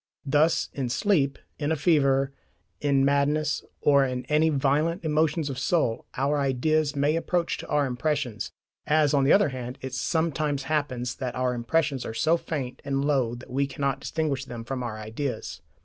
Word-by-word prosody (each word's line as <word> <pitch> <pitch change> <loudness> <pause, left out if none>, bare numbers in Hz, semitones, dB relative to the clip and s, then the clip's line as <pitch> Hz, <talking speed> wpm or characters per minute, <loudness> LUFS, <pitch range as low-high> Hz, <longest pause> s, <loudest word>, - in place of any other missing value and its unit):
Thus 150 +4 +2
in 130 -3 -2
sleep, 140 - +1 0.2
in 150 0 -1
a - - +3
fever, 140 -3 +2 0.5
in 140 -2 +2
madness, 145 +2 +1 0.2
or 140 -1 +5
in 125 -1 -2
any 150 +3 +3
very 150 - 0
violent 155 +6 +1
emotions 155 0 +1
of 135 -2 -4
soul, 130 -6 0
our 140 +3 +1
ideas 145 +3 +1
may 145 +2 +2
approach 170 +1 -1
to - - -7
our 145 -1 +2
impressions; 130 -3 -2 0.4
as, 150 -1 +3
on 140 -2 +3
the 140 - +4
other 200 -5 +5
hand, 125 0 -6
it 130 -1 -6
sometimes 150 -1 0
happens, 130 -5 -1
that 125 -2 -4
our 125 0 0
impressions 135 +3 0
are 110 - -6
so 160 +7 +3
faint 140 -7 -4
and 140 0 -1
low 130 -5 +1
that 125 +1 -12
we 140 +2 +1
cannot 140 -1 -2
distinguish 145 -4 -2
them 120 -3 -7
from 130 +2 -4
our 115 -3 -4
ideas. 110 +6 -5
140 Hz, 180 wpm, -26 LUFS, 130-155 Hz, 0.5 s, or